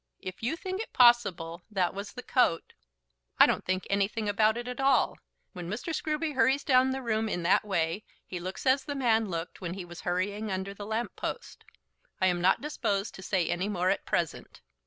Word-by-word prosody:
If 185 0 -7
you 245 +8 0
think 375 +3 -4
it - - -7
possible 200 -9 +4
that 190 -4 0
was 200 +1 -6
the 250 - -8
coat 245 -10 +1 0.3
" - - -50
"I - - +10
don't - - 0
think 185 0 -1
anything 200 +2 0
about 215 +2 +3
it 240 0 -5
at 250 0 -5
all. 270 0 +3 0.3
When 175 -1 -6
Mr. 215 - -4
Scruby 310 0 -1
hurries 265 +1 +3
down 255 -1 +4
the 265 0 -3
room 220 -1 0
in 175 -4 -2
that 175 - +4
way 190 -1 -1 0.2
he 180 - -6
looks 185 +7 -6
as 265 +1 +4
the 285 0 -4
man 225 -5 +2
looked 165 +1 -5
when 175 -1 -4
he 190 -2 -6
was 175 -1 -10
hurrying 200 +4 -1
under 190 +1 -3
the 205 0 -8
lamp 220 +2 -2
post. 480 - -6 0.5
I 185 - +3
am 175 -2 +2
not 185 +2 +3
disposed 205 -9 -2
to - - -10
say 185 -3 0
any 185 +3 -1
more 185 -2 +1
at 200 - -1
present." - - -2
205 Hz, 210 wpm, -29 LUFS, 185-250 Hz, 0.5 s, I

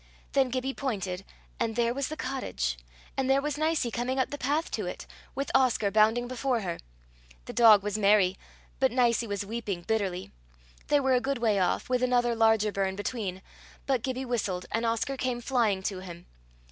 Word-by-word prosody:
Then 270 -2 +3
Gibbie 260 +2 -2
pointed, 195 -9 -3 0.4
and 225 -1 -1
there 235 0 +2
was 275 0 -2
the 310 - -6
cottage, 65 - -3 0.4
and 265 -1 0
there 270 +1 +5
was 295 0 -2
Nicie 310 -5 0
coming 245 +3 -2
up 260 - 0
the 290 - -4
path 295 +5 0
to - - -2
it, - - -6 0.3
with 275 - -2
Oscar 245 -6 +3
bounding 220 +3 +3
before 255 -1 -1
her! 175 -4 -4 0.7
The - - -7
dog 220 -4 +7
was 210 +1 -2
merry, 200 -2 +4 0.4
but 265 -1 +3
Nicie 240 -1 +2
was 200 -1 -3
weeping 205 -5 -4
bitterly. 190 -3 -2 0.6
They 290 - +4
were 265 -1 +2
a 250 - +3
good 275 +1 -1
way 220 -4 +2
off, 180 -1 0
with 250 0 +1
another 245 -1 +2
larger 220 -2 +3
burn 195 -1 -1
between; 200 -3 -4 0.4
but 265 -4 +1
Gibbie 260 +1 -3
whistled, 200 -7 -2
and 230 +1 0
Oscar 230 +4 -1
came 255 -2 -1
flying 230 -6 +1
to 190 -1 -2
him. 175 -2 -10
235 Hz, 185 wpm, -28 LUFS, 200-260 Hz, 0.7 s, dog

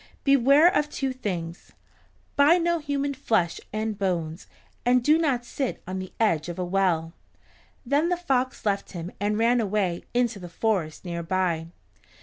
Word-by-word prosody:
Beware 275 +3 +6
of 295 0 +1
two 270 -3 -2
things. 175 -8 -5 0.6
Buy 290 +5 +6
no 340 -1 +1
human 285 -1 -2
flesh 220 -10 0
and 215 -1 -3
bones, 170 -3 -2 0.4
and 245 0 +3
do 300 +4 +5
not 265 -7 0
sit 265 +1 -3
on 185 +1 -4
the 185 0 -7
edge 170 -8 +1
of 175 - -6
a 180 - -2
well." 175 -3 0 0.7
Then 290 +7 +2
the 355 - +1
fox 260 -9 -1
left 200 -1 -1
him 175 0 -6
and 210 +1 0
ran 235 +2 +3
away 195 -4 -1
into 240 -4 +1
the 175 -2 -8
forest 180 -3 -1
near 170 -1 -3
by. 170 -2 -1
215 Hz, 160 wpm, -26 LUFS, 175-270 Hz, 0.7 s, Beware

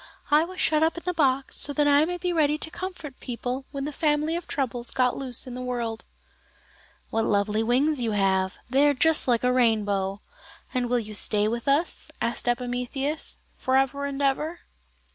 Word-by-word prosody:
"I 300 +2 +6
was 365 +1 -9
shut 310 -1 +2
up 320 +1 +2
in 340 - -6
the 360 - 0
box 275 -4 +1
so 285 - +2
that 295 0 +2
I 290 +1 +5
might 355 +1 -4
be 360 -1 0
ready 300 -2 +2
to 320 - -5
comfort 355 -8 -7
people 250 +2 -4
when 275 -1 -4
the 300 - -3
family 305 +2 +1
of 345 0 -5
troubles 245 -3 -2
got 250 -1 +1
loose 255 -3 0
in 255 - -7
the 250 - -5
world." 240 -3 -3 1.1
"What 225 - +1
lovely 210 +1 +1
wings 260 +5 +2
you 225 -2 0
have! 190 -2 +1
They 275 +4 +4
are 290 - +3
just 320 +3 +4
like 240 -2 +2
a 250 0 +3
rainbow. 205 -5 +1 0.5
And 250 -2 0
will 245 - +2
you 215 -2 -4
stay 210 0 +1
with 235 +3 -3
us," 290 +5 +1
asked 235 +1 -2
Epimetheus, 250 +4 -2 0.2
"for 260 0 +2
ever 280 +1 +1
and 280 0 -3
ever?" 305 +5 0
265 Hz, 195 wpm, -26 LUFS, 235-300 Hz, 1.1 s, I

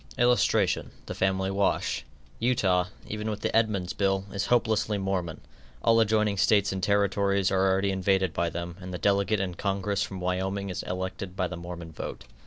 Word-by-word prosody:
[Illustration: 120 0 +2 0.2
THE - - -5
FAMILY 95 0 0
WASH.] 100 0 0 0.3
Utah, 95 -7 +2 0.2
even 105 +1 -4
with 105 -1 -4
the - - -1
Edmunds 105 -5 +1
bill, 95 -1 0
is 100 -1 -1
hopelessly 110 -3 +2
Mormon; 95 -4 -2 0.4
all 115 0 +5
adjoining 105 -2 +2
States 100 +1 +3
and 95 -1 -3
Territories 100 0 +2
are 95 0 +3
already 95 +1 +1
invaded 95 -1 +1
by 85 0 0
them, 85 +1 -5
and 90 0 -7
the 90 - -3
delegate 100 +3 +2
in 95 -2 -2
Congress 100 +2 -1
from 95 -3 -3
Wyoming 95 +2 -2
is - - -3
elected 95 +1 -5
by 95 - 0
the 90 - -6
Mormon 85 -1 -7
vote. 75 - -6
95 Hz, 175 wpm, -27 LUFS, 90-100 Hz, 0.4 s, all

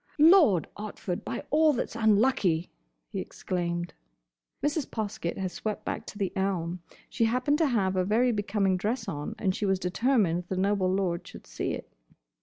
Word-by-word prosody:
"Lord 305 - +6
Otford, 205 -2 -5
by - - -4
all 310 0 +5
that's 240 - -3
unlucky!" 210 -6 +2 0.4
he - - -3
exclaimed. 175 -1 -3 0.7
Mrs. 290 0 0
Poskett 210 -5 -3
had 190 -1 -2
swept 215 +2 -4
back - - -4
to - - -8
the 195 -3 -2
elm. 185 -3 -1 0.3
She 230 - +1
happened 255 +6 +1
to 320 - +4
have 195 -7 +1
a 185 - +2
very 230 +6 +3
becoming 205 -3 +1
dress 215 +7 -2
on, 145 -1 -4
and 190 -2 0
she 205 - -2
was 190 0 +2
determined 185 -2 +1
the 190 - -3
noble 195 -1 +2
lord 185 -3 -1
should - - -11
see - - -3
it. - - -8
200 Hz, 170 wpm, -28 LUFS, 185-230 Hz, 0.7 s, Lord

